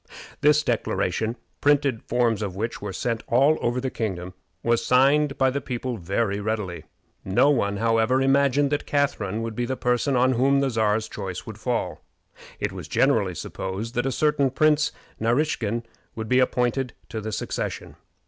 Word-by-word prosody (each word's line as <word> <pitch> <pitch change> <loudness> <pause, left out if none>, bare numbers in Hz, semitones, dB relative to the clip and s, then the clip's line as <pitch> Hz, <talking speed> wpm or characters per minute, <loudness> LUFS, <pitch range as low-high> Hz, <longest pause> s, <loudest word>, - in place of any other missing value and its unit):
This 150 +1 +4
declaration, 115 -4 -1 0.3
printed 140 -5 +2
forms 120 -3 +1
of 100 -3 -3
which 115 +4 -3
were 105 -1 -4
sent 115 +4 -2
all 140 +6 +4
over 120 +1 0
the 130 0 -3
kingdom, 90 -5 -4 0.3
was 115 0 +2
signed 140 +4 +3
by 135 -1 +3
the 140 +2 -2
people 125 -1 -4
very 100 +3 -1
readily. 105 -4 -3 0.4
No 120 +10 +3
one, 100 -7 0
however, 115 +3 +2
imagined 140 +1 +3
that 145 - -1
Catharine 115 -7 0
would 115 -1 -4
be 120 +1 -1
the 130 0 -2
person 125 +3 +1
on 130 +1 +4
whom 135 +3 +3
the 135 -1 +1
Czar's 110 -1 +1
choice 95 -3 -6
would 110 -1 -9
fall. 110 -9 -2 0.6
It - - -1
was - - -8
generally 110 -10 +2
supposed 95 +8 -5
that 120 +2 0
a - - 0
certain 145 0 +2
Prince 150 +2 +3 0.3
Naraskin 115 -2 0 0.3
would 110 -1 -4
be 125 +3 +3
appointed 125 0 +1 0.2
to 110 - -4
the 110 +1 -4
succession. - - -4
120 Hz, 165 wpm, -24 LUFS, 110-135 Hz, 0.6 s, This